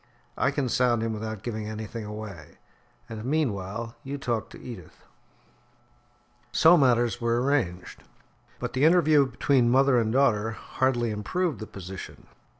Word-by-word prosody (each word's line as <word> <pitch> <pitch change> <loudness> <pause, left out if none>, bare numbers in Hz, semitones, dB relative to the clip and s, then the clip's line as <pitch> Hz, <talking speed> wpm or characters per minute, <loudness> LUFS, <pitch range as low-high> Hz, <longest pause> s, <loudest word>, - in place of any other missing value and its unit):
Leave - - -34
the - - -35
matter - - -36
to - - -8
me. - - +3
I - - +2
can 135 -4 0
sound 120 -2 +2
him 115 -1 -1
without 110 -1 -5
giving 110 -3 -4
anything 110 +1 -6
away, 105 -7 -8 0.5
and 110 -2 -7
meanwhile 115 -5 -2
you 140 +1 -5
talk 120 -5 -2
to - - -12
Edith." 110 -10 -11 1.5
So 165 +2 +6
matters 120 -5 +2
were 115 0 +1
arranged, 125 -10 -1 0.6
but - - -5
the 130 +2 0
interview 155 -4 +5
between 125 0 +2
mother 130 0 +4
and 110 -1 0
daughter 110 -4 +2
hardly 120 0 -1
improved 130 - -2
the 110 - -7
position. 95 0 -9
115 Hz, 160 wpm, -26 LUFS, 105-135 Hz, 1.5 s, So